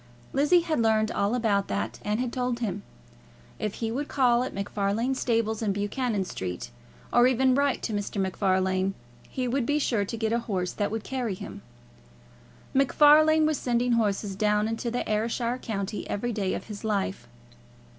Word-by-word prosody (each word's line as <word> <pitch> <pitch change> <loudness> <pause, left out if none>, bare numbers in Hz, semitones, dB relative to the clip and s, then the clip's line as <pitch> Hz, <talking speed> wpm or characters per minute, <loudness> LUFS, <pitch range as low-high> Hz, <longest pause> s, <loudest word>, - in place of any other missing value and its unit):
Lizzie 295 +6 +4
had 320 -7 0
learned 220 -1 +2
all 200 +4 0
about 210 -5 +1
that, 200 - -3
and 210 +2 -1
had 250 -1 -2
told 250 -1 -1
him. 205 -4 -3 0.8
If 210 - -2
he 225 -1 -3
would 285 +5 -2
call 245 -3 +3
at 255 - -2
MacFarlane's 205 +6 -1
stables 225 -2 0
in 210 -3 +1
Buchanan 205 0 -1
Street, 95 - -5 0.4
or 240 +1 +6
even 260 +1 +3
write 280 0 +1
to 225 - -2
Mr. 205 0 -3
MacFarlane, 190 0 +1 0.3
he 255 -1 -2
would 260 +2 0
be 290 +5 +1
sure 235 -8 +1
to 230 +4 -5
get 220 0 0
a 235 - +2
horse 190 -6 -2
that 205 - -1
would 220 0 -4
carry 245 -7 -2
him. - - -8 1.1
MacFarlane 305 +3 +5
was 310 -1 +1
sending 245 0 +1
horses 205 -3 0
down 210 +1 +2
into 225 +2 -2
the 245 +1 -2
Ayrshire 230 +3 -1
country 205 -3 -4
every 240 +4 -2
day 200 -3 -1
of - - -5
his 210 -1 -8
life. 195 - -2
225 Hz, 175 wpm, -27 LUFS, 200-250 Hz, 1.1 s, or